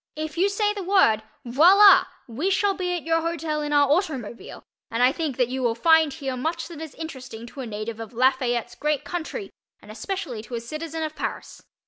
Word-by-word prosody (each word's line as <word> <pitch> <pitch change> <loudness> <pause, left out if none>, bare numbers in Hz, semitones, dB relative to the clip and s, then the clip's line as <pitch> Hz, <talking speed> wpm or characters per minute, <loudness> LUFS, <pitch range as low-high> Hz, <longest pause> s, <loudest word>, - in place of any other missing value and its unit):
If 310 +1 -5
you 375 +4 +2
say 415 +1 0
the 410 - -5
word, 365 - +3 0.2
voila! 360 +12 +7 0.2
we 270 +11 -2
shall 395 +1 +2
be 360 -2 -2
at 345 - -5
your 330 0 +1
hotel 325 -2 -2
in 295 0 -3
our 290 -1 +4
automobile 280 - -2 0.3
and 230 +2 0
I 250 - +6
think 305 -4 -3
that 250 -2 +1
you 260 +1 -3
will 235 -2 +1
find 320 +4 +4
here 270 -4 -4
much 320 +7 -3
that 325 -2 -9
is 320 -3 -8
interesting 260 -8 -8
to 240 - -12
a 250 - -6
native 215 +1 -5
of 225 0 -7
Lafayette's 245 -1 +1
great 295 +4 -1
country 355 +5 -5 0.3
and - - -13
especially 370 - -5
to 235 +2 -8
a - - -2
citizen 310 +6 -5
of 310 0 -4
Paris. - - -6
300 Hz, 205 wpm, -24 LUFS, 245-335 Hz, 0.3 s, voila